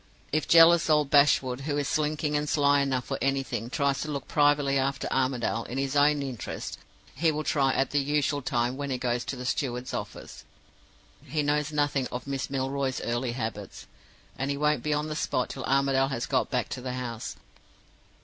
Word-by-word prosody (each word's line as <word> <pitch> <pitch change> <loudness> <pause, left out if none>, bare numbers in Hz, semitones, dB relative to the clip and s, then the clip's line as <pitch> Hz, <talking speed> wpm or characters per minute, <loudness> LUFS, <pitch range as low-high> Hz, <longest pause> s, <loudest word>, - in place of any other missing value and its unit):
If 155 +1 0
jealous 170 0 +7
old 150 -2 +3
Bashwood, 135 -3 +4
who 145 +1 -2
is 145 -2 -1
slinking 150 0 0
and 150 0 -1
sly 145 -1 +3
enough 130 -3 0
for - - -4
anything, 135 -4 -1
tries 140 -1 0
to 155 - -4
look 140 -3 -4
privately 145 -2 +3
after 135 +1 -1
Armadale, 125 -3 0
in 125 - -6
his 135 +1 -1
own 145 0 +4
interests, 130 -5 -6 0.3
he 160 +4 +2
will 155 0 -3
try 135 -3 +2
at 135 - +1
the 145 - +2
usual 145 0 0
time 125 -1 -1
when 140 0 -4
he 130 - -1
goes 120 -1 -1
to - - -4
the 125 0 -7
steward's 125 -1 -2
office. - - -7 0.8
He 155 -1 -2
knows 150 +1 0
nothing 145 -3 0
of 125 0 -6
Miss 135 -1 -3
Milroy's 135 0 -1
early 120 +1 -2
habits; 115 -3 -5 0.5
and 135 +1 -1
he 140 - -1
won't 150 -2 +1
be 150 - -2
on 150 +1 0
the 155 - -4
spot 130 -4 -1
till 130 - -6
Armadale 135 0 +2
has 125 -4 -3
got - - 0
back - - -1
to - - -5
the 125 0 -4
house. 125 -1 -5
140 Hz, 195 wpm, -27 LUFS, 130-145 Hz, 0.8 s, jealous